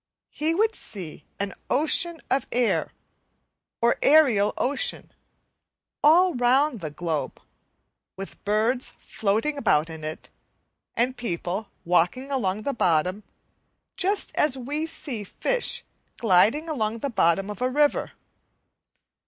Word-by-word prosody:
He 315 +2 -1
would 440 +4 +2
see 180 - -7
an 200 0 -3 0.2
ocean 320 +4 +2
of 270 - +1
air, 245 -1 +1 0.9
or 235 - +3
aerial 260 -9 +5
ocean, 290 - -1 0.9
all 345 +4 +6
round 250 +1 +2
the 160 -4 -5
globe, 160 0 -3 0.8
with 195 0 -9
birds 220 +5 0
floating 225 +8 -1
about 165 - +2
in 160 -1 -9
it, 155 +1 -7 0.6
and 250 +2 +1
people 195 -2 -4 0.2
walking 180 +11 +1
along 215 -6 -1
the 280 - -1
bottom, 180 0 +1 0.7
just 395 +3 0
as 285 -3 +2
we 290 +5 -3
see 260 -9 -6
fish - - 0 0.3
gliding 225 - +3
along 230 -8 -2
the 275 +4 -3
bottom 195 0 +2
of 210 - -9
a 255 - +1
river. 290 +2 +1
240 Hz, 120 wpm, -25 LUFS, 195-295 Hz, 0.9 s, all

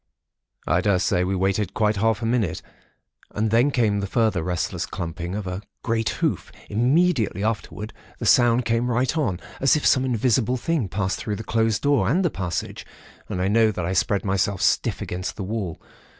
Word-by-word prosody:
"I 85 +4 +2
daresay 95 -1 +2
we 95 +2 -1
waited 95 +1 0
quite 105 -1 +1
half 110 +1 +1
a - - 0
minute, 115 -7 0 0.7
and 110 +1 0
then 120 +5 +4
came 110 -7 +1
the 100 - -2
further 110 -3 +1
restless 90 +1 -2
clumping 85 0 -5
of 105 -1 -4
a 90 +1 -4 0.2
great 115 -1 0
hoof. - - -2 0.2
Immediately 125 - +2
afterwards, 110 -1 -3 0.2
the - - -5
sounds 120 0 +4
came 120 +1 0
right 125 +4 +1
on, 110 - 0 0.2
as 135 +2 +4
if 150 - -1
some 130 - +4
invisible 125 0 +1
thing 140 - -1
passed 95 +2 -2
through 105 - -3
the 110 - -6
closed 115 0 0
door, 140 -8 +3
and 180 +8 +2
the 170 - +1
passage, 90 -4 -4 0.5
and 90 - -3
I 90 - +1
know 110 +2 +4
that 90 -5 -3
I 90 - -1
spread 100 +1 +1
myself 95 0 0
stiff - - +1
against 90 +1 -4
the 100 - -5
wall. 95 -4 -4
105 Hz, 185 wpm, -23 LUFS, 95-120 Hz, 0.7 s, then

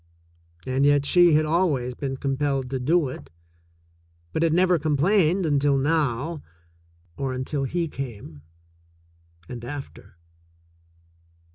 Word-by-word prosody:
And 130 +1 0
yet 145 0 +3
she 175 +1 +5
had 155 +1 +3
always 155 -7 0
been 135 +1 -4
com 135 0 -2
pelled 135 -2 -1
to 135 - -2
do 155 +4 +2
it, 80 - -9 1.0
but - - -1
had 165 -1 +3
never 180 +1 +3
complained 170 +4 +2
until 145 -2 +2
now 150 +1 0 0.4
— 85 +1 -36
or 135 -1 -2
until 135 +2 -3
he 170 +4 -1
came, 115 - -8 1.1
and 120 -2 -8
after. 135 -8 -9
140 Hz, 125 wpm, -24 LUFS, 130-160 Hz, 1.1 s, she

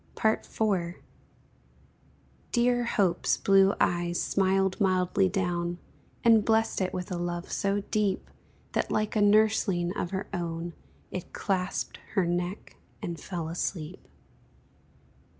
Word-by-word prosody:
IV. 200 -5 0 1.6
Dear 245 0 +2
Hope's 190 -7 +1
blue 195 0 +4
eyes 175 0 +1
smiled 190 +1 +1
mildly 185 0 +2
down, 175 -2 -1 0.5
And 225 -2 +6
blest 225 -1 +2
it 185 - 0
with 180 +1 -5
a 180 - -1
love 175 0 -4
so 200 0 0
deep, 205 -3 0 0.4
That, - - 0
like 215 0 0
a 215 - +3
nursling 205 -4 +3
of 175 - -2
her 190 +1 -3
own, 170 -1 -3 0.4
It 185 - -6
clasped 185 -2 -2 0.2
her 190 - +3
neck 175 +3 -3 0.3
and 170 -4 -4
fell 170 -4 -4
asleep. 165 0 -4
190 Hz, 115 wpm, -28 LUFS, 175-205 Hz, 1.6 s, And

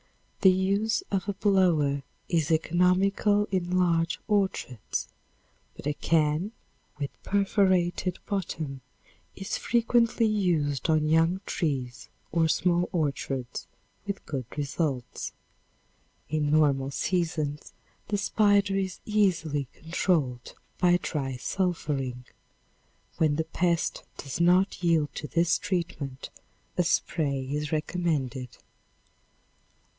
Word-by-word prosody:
The 190 - +8
use 200 - +1
of 195 0 -1
a - - 0
blower 175 -8 +2 0.3
is 165 -3 +1
economical 185 +5 +3
in 180 -1 0
large 165 -2 +2
orchards, 190 - -1 0.7
but - - -11
a 150 - +1
can 160 +6 +1 0.4
with 140 -2 -3
perforated 185 -3 +1
bottom 160 - -3 0.5
is 195 - -3
frequently 235 0 +2
used 170 - +1
on 155 -1 +3
young 165 +4 +3
trees 130 -7 -3 0.2
or 165 0 +3
small 175 +3 +2
orchards 135 -5 -2 0.4
with 200 -1 -4
good 130 -5 -4
results. 140 -3 -2 1.0
In 150 -1 0
normal 145 -3 +3
seasons 155 -2 -2 0.4
the 205 - 0
spider 200 -1 +3
is 190 -1 -2
easily, 165 - +1
controlled 160 -7 -1 0.2
by 180 -1 +5
dry 135 -6 -3
sulphuring. 135 -6 -2 0.9
When 155 -2 +3
the 160 - 0
pest 170 +1 0 0.2
does 140 +4 -4
not 180 +3 +3
yield 165 -4 +2
to 150 - -5
this 170 +1 +2
treatment, 150 -7 -3 0.4
a 180 - +2
spray 140 -5 0
is 150 0 -2
recommended. 150 -6 -2
165 Hz, 105 wpm, -27 LUFS, 145-190 Hz, 1.0 s, The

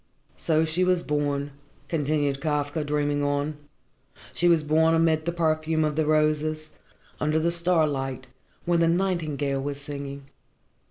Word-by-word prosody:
"So 160 -1 +2
she 160 +3 0
was 180 -1 +2
born," 145 -1 -1 0.4
continued 145 -3 0
Kafka, 150 +1 -1
dreaming 145 0 0
on. 145 +1 -1 0.8
"She 175 - +1
was 165 -3 +4
born 160 +2 +3
amid 160 -1 +2
the 170 - 0
perfume 160 -1 0
of 150 -1 -1
the 155 -1 0
roses, 155 0 +1 0.5
under 155 +1 +1
the 165 +2 +1
starlight, 155 -7 0 0.4
when 175 -1 +2
the 165 - +3
nightingale 155 -6 0
was 140 0 -4
singing. 140 -1 -7
155 Hz, 140 wpm, -25 LUFS, 145-165 Hz, 0.8 s, was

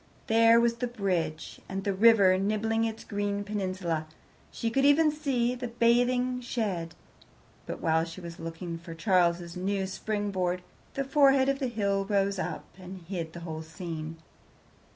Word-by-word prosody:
There 230 +1 +6
was 235 0 +2
the 245 +1 -1
bridge, 185 -9 -2
and 195 0 -3
the 200 - 0
river 200 -2 +6
nibbling 220 +3 0
its 225 -1 -4
green 205 -1 -2
peninsula. 185 -6 -2 0.4
She 230 - -2
could 270 +3 +2
even 300 +2 +5
see 265 -5 0
the 250 0 -4
bathing 245 +2 +2
shed, 200 -9 -3 0.7
but - - -5
while 160 0 +2
she 165 +1 -7
was 170 -1 -9
looking 165 +1 -6
for 165 -1 -9
Charles's 175 -2 +1
new 190 +1 -1
springboard, 190 -3 -2 0.3
the 275 - 0
forehead 275 -1 +4
of 275 0 0
the 265 - 0
hill 200 -4 0
rose 195 -1 +1
up 175 -4 -4
and 185 0 -9
hid 165 -2 -5
the 170 - -8
whole 160 -2 -5
scene. 160 -1 -6
200 Hz, 155 wpm, -28 LUFS, 175-235 Hz, 0.7 s, There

